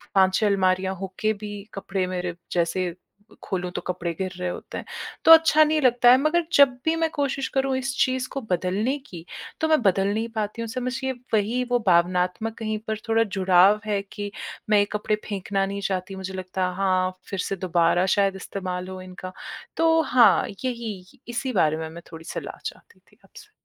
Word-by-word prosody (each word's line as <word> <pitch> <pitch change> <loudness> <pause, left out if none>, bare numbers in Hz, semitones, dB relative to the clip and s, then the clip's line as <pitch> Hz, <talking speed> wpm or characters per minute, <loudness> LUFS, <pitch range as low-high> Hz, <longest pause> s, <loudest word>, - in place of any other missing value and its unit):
5-6 190 +2 +4
अलमारियाँ 190 -1 +1
होके 195 +3 -1
भी 205 0 -5 0.2
कपड़े 195 -1 -2
मेरे 180 -1 -3 0.2
जैसे 175 +1 0 0.5
खोलूँ, 180 -1 -3
तो - - -4
कपड़े 175 -1 -2
गिर 185 -1 -2
रहे 180 - -3
होते - - -7
हैं, - - -6 0.4
तो 325 - +8
अच्छा 320 -1 +8
नहीं 310 0 +1
लगता 245 -1 +5
है। 255 - +8
मगर 325 +4 +2
जब 280 -1 +7 0.2
भी 320 0 +2
मैं 325 0 +1
कोशिश 275 -2 -1
करूँ 270 0 +1
इस 260 0 -3
चीज़ 260 0 -1
को 275 - -4
बदलने 190 +9 0
की, 170 -2 -10 0.4
तो 315 - +2
मैं 310 -4 +3
बदल 195 -1 +2
नहीं 225 +2 -1
पाती 215 +1 -3
हूँ। 230 - -3
समझिए 255 +2 -2 0.2
वही 220 +4 +1
वो 245 - +3
भावनात्मक 180 +5 +2
कहीं 215 -1 -2
पर 220 - -1
थोड़ा 225 0 +4
जुड़ाव 190 0 +4
है 205 -2 0
कि 205 -1 -5 0.4
मैं 210 -1 +5
ये 205 - +3
कपड़े 210 0 0
फेंकना 195 -1 -1
नहीं 200 +1 -4
चाहती। 190 0 -3
मुझे 190 0 -6
लगता 185 0 -2
है, 180 - -5
हाँ, 185 -1 +1
फिर 195 - -4
से 195 - -1
दोबारा 175 -1 +2
शायद 195 -1 +2
इस्तेमाल 185 -1 -5
हो 185 0 -7
इनका। 185 0 -9 0.5
तो 325 0 +4
हाँ, 255 -6 +5 0.2
यही, 235 -2 -5
इसी 245 +2 -3
बारे 155 -6 +2
में 160 0 -5
मैं 170 +2 -10
थोड़ी 165 0 -10
सलाह - - -6
चाहती 460 - -8
थी - - -29
आपसे। 440 -2 -15
200 Hz, 190 wpm, -24 LUFS, 185-245 Hz, 0.5 s, तो